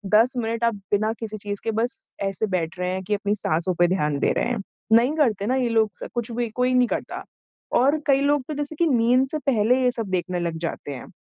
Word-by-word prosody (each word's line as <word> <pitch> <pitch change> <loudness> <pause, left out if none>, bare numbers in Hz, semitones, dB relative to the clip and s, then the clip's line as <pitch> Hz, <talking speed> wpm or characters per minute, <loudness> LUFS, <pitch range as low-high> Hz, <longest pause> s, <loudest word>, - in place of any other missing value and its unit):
10 235 +5 +5
minute 230 0 -2
आप 230 -1 +2 0.2
बिना 215 +2 +2
किसी 215 -2 -5
चीज़ 205 0 -5
के 225 - 0
बस 245 +3 -2 0.2
ऐसे 195 +2 -1
बैठ 180 -2 -2
रहे 180 0 -1
हैं 190 0 -3
कि 210 - -2
अपनी 205 0 0
साँसों 170 -2 0
पे 175 - +6
ध्यान 150 -6 0
दे - - +2
रहे - - +1
हैं। 240 -4 -2 0.3
नहीं 240 +5 +5
करते 220 -10 +2
ना 255 - +2
ये 255 -2 +1
लोग 225 -2 +3
स - - -7
कुछ 240 -1 -3
भी, 235 0 -2
कोई 250 +3 0
नहीं 250 -1 +4
करता। - - -4 0.5
और 280 +5 +3
कई 275 -1 +4
लोग 285 -1 +2
तो 310 - -3
जैसे 290 +2 -4
कि 335 +2 +2
नींद 250 0 +3
से 305 +3 -3
पहले 250 -2 +2
ये 250 - +3
सब 230 -3 -4
देखने 180 -1 -1
लग 170 -1 -2
जाते 145 - -6
हैं। 125 - -9
225 Hz, 245 wpm, -24 LUFS, 195-255 Hz, 0.5 s, पे